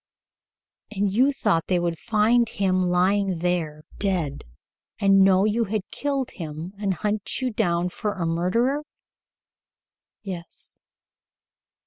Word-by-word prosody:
"And 200 -2 -1
you 260 +6 +4
thought 165 - +1
they 185 - +2
would 170 -2 -2
find 230 +1 +2
him 190 -4 +1
lying 185 +1 +2
there 165 -3 -2 0.2
dead 175 -8 -1 0.5
and 195 -1 +5
know 190 0 +5
you 225 +2 +1
had 210 -1 -2
killed 275 -3 -2
him 165 +1 -7
and 195 -3 0
hunt 210 +2 -2
you 255 -1 -1
down 180 -5 0
for 210 +3 -3
a 180 -4 -3
murderer?" 195 - +1 1.4
"Yes." 180 -4 -8
195 Hz, 120 wpm, -24 LUFS, 175-215 Hz, 1.4 s, and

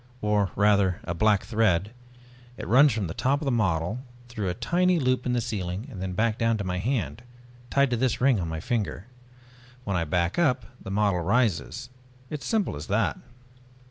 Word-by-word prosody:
"Or 105 -3 +1
rather 100 -2 +3
a 85 - -3
black 105 +3 +2
thread. 105 -3 +1 0.7
It - - -6
runs 135 +5 +6
from 110 -3 -2
the 80 - -4
top 135 +8 +1
of 155 - -5
the 135 - +1
model, 95 -2 0 0.3
through 105 -5 -3
a 90 - -3
tiny 180 +9 +2
loop 130 -4 0
in 125 - +1
the 120 - +2
ceiling, 100 -1 -4
and 95 -4 -5
back 110 +3 +1
down 115 -1 +2
to 100 - -3
my 90 -1 -2
hand 120 +1 -2 0.5
tied 140 -2 +2
to 120 - +1
this 130 0 0
ring 130 -4 +3
on 85 - -2
my 80 -1 -4
finger. 105 -3 -2 0.8
When 100 -5 -2
I 85 -2 0
back 85 - 0
up 130 -7 +2 0.2
the - - -8
model 100 -2 +1
rises. 110 +4 0 0.4
It's 150 -2 -5
as - - -3
simple 220 -3 0
as 75 +2 -7
that." 100 +1 0
105 Hz, 195 wpm, -26 LUFS, 95-125 Hz, 0.8 s, runs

